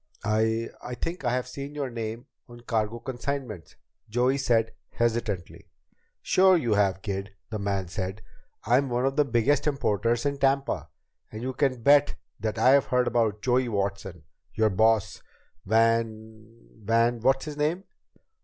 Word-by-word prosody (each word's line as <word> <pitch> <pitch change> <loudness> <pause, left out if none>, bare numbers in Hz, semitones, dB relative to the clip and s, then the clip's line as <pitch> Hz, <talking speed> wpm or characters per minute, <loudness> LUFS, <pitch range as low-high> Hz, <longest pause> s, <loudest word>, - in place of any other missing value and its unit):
"I 110 +2 +1
I 125 - -5
think 165 +4 -5
I 120 - +1
have 125 0 -1
seen 140 +3 -7
your 140 -3 -3
name 115 +1 -5 0.2
on 120 0 -12
cargo 115 -1 -1
consignments," 125 -5 -5 0.3
Joey 125 +5 +1
said 115 -4 +1 0.2
hesitantly. 115 -6 -2 0.5
"Sure 190 0 +5
you 120 -9 0
have, 95 -2 +1
kid," 100 -1 -4 0.2
the 110 - -3
man 100 -2 -2
said. 95 +4 -5 0.4
"I'm 130 +5 +3
one 120 +1 0
of 135 0 0
the 150 - +4
biggest 140 +3 +1
importers 120 -4 0
in 140 -1 -1
Tampa. 135 0 0 0.4
And 110 +2 -7
you 130 +1 -3
can 130 -4 0
bet 145 +2 +5 0.2
that 110 +1 -3
I've 130 +5 +5
heard 125 0 +1
about 110 -4 0
Joey 125 0 +2
Watson. 100 -5 -3 0.3
Your 110 -1 +2
boss, 110 +1 +2 0.5
Van 110 0 0 0.2
Van 115 +2 +2
What's 135 +4 +2
his 150 -1 -7
name 155 +5 0
115 Hz, 150 wpm, -26 LUFS, 110-135 Hz, 0.5 s, Sure